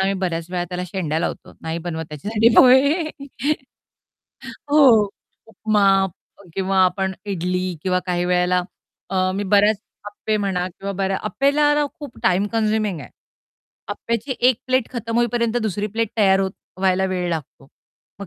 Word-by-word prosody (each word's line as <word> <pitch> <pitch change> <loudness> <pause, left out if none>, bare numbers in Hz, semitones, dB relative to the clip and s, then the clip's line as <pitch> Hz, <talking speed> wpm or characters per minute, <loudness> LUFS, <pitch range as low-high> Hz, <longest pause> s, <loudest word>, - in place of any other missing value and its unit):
आम्ही 195 +1 +1
बऱ्याच 170 -3 -2
वेळा 180 -1 -1
त्याला 180 +1 -4
शेंड्या 165 -4 -2
लावतो. - - -4
नाही 165 +1 -3
बनवत 160 -1 -4
त्याच्यासाठी 210 +10 +1
पोहे. 280 +6 +5 1.6
हो. 240 -9 +6 0.4
उपमा 215 -2 +1 0.7
किंवा 190 0 0
आपण 190 +1 0
इडली 180 -2 -2 0.2
किंवा 180 -1 +1
काही 175 0 0
वेळेला 180 0 +2 0.5
अ, 185 -1 +1
मी 200 +1 -2
बऱ्याच 205 +2 +4 0.3
अप्पे 215 +1 -2
म्हणा 190 -3 -1
किंवा 195 +2 -6
बऱ्या 195 0 0
अप्पेला 285 +6 +2
न, 295 0 +1
खूप 285 -5 -9
टाईम 190 +2 +2
कन्झ्युमिंग 215 -5 0
आहे. 125 - -11 0.8
अप्याची 235 +3 -3
1 255 - +3
प्लेट 255 -2 +1
खतम 230 -2 -4
होईपर्यंत 240 0 +1
दुसरी 205 -1 -2
प्लेट 225 +2 -2
तयार 195 -3 +4
होत 190 -1 -1 0.3
व्हायला 190 0 +2
वेळ 180 -1 -2
लागतो, 145 -4 -6 0.5
मग 200 - -6
195 Hz, 145 wpm, -21 LUFS, 180-225 Hz, 1.6 s, हो